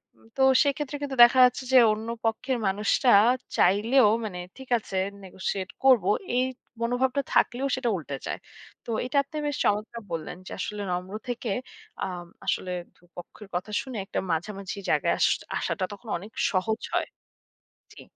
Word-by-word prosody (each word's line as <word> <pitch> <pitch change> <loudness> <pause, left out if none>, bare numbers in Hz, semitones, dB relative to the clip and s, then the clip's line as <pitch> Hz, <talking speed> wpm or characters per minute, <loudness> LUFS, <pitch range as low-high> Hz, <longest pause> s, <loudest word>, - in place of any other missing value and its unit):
উম - - -24
তো - - 0 0.2
সেক্ষেত্রে 290 0 -1
কিন্তু 275 -2 -4
দেখা 240 +2 +6
যাচ্ছে 250 +2 0
যে - - +9 0.2
অন্য 220 +1 -6 0.2
পক্ষের 250 +3 0
মানুষটা 210 +5 +2 0.5
চাইলেও 210 +6 +5 0.2
মানে 180 -4 -5 0.2
ঠিক 265 -1 -11
আছে 195 -3 -6 0.3
negotiate 190 0 -4
করব। 255 -8 +6 0.3
এই 255 - +4 0.4
মনোভাবটা 250 +3 +1
থাকলেও 255 +3 +2
সেটা 255 -2 -1
উল্টে 145 -5 -5
যায়। - - -3 0.5
তো - - -10 0.2
এটা 265 +3 +2
তে 310 - -5
বেশ 290 -1 -1
চমৎকার 215 +3 0
বললেন 165 +1 -4
যে - - -9
আসলে 210 -1 -4
নম্র 180 +2 -3 0.2
থেকে 240 -2 -3 0.5
আম 175 -2 -6 0.2
আসলে 185 - -1 0.2
২ - - -29
পক্ষের 185 +4 -10
কথা 180 +4 -3
শুনে 260 -4 -7
একটা - - -3
মাঝামাঝি 195 +4 -3
জায়গায় - - +2
আশ - - +5 0.3
আসাটা 190 - -2
তখন 205 +3 -11
অনেক 200 +5 -11 0.2
সহজ 220 +4 0
হয়। - - 0 0.8
জি। - - -13
220 Hz, 160 wpm, -26 LUFS, 190-255 Hz, 0.8 s, যে